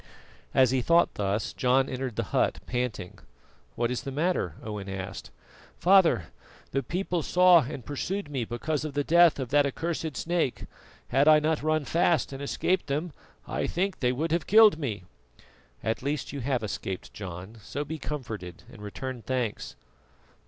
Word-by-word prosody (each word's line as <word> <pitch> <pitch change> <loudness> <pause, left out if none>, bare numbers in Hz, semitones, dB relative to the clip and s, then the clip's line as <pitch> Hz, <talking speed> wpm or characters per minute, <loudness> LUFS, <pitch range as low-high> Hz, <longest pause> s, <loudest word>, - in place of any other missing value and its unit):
As 130 -2 +5
he 130 -1 +2
thought 170 +6 +3
thus 100 +1 -1
John 130 +1 +2
entered 130 -2 -4
the 115 - -1
hut, - - +2
panting. 125 -7 -3 0.6
"What 120 +1 0
is 125 - -2
the 135 - -6
matter?" 145 - 0
Owen 105 -2 -5
asked. 95 -9 -6 0.5
"Father, 170 - +4 0.4
the 135 - 0
people 180 +2 -2
saw 180 0 +6
and 130 -6 -7
pursued 190 +7 -3
me 135 -4 -2
because 145 +6 -2
of 150 -3 -5
the 145 - +1
death 170 +1 +5
of 130 -3 -4
that 145 +1 +4
accursed 160 -1 -3
snake. 170 -6 -1 0.4
Had 135 +4 +3
I 155 0 +8
not 155 +1 0
run 155 -1 +1
fast 165 -3 +1
and 135 - -7
escaped 175 +5 0
them, 150 +4 -2 0.3
I - - -2
think 190 +2 -1
they 125 -1 +2
would 155 +6 -2
have 170 -1 0
killed 215 -5 +7
me." 110 - -3 0.8
"At 110 - -1
least 145 +3 -3
you 140 - -4
have 130 -2 -1
escaped, 95 -2 -5
John; 95 +2 -8
so 145 +8 -4
be 155 +2 -5
comforted 110 - -6
and 105 - -12
return 125 +4 -6
thanks." 125 -3 -3
135 Hz, 165 wpm, -27 LUFS, 115-160 Hz, 0.8 s, I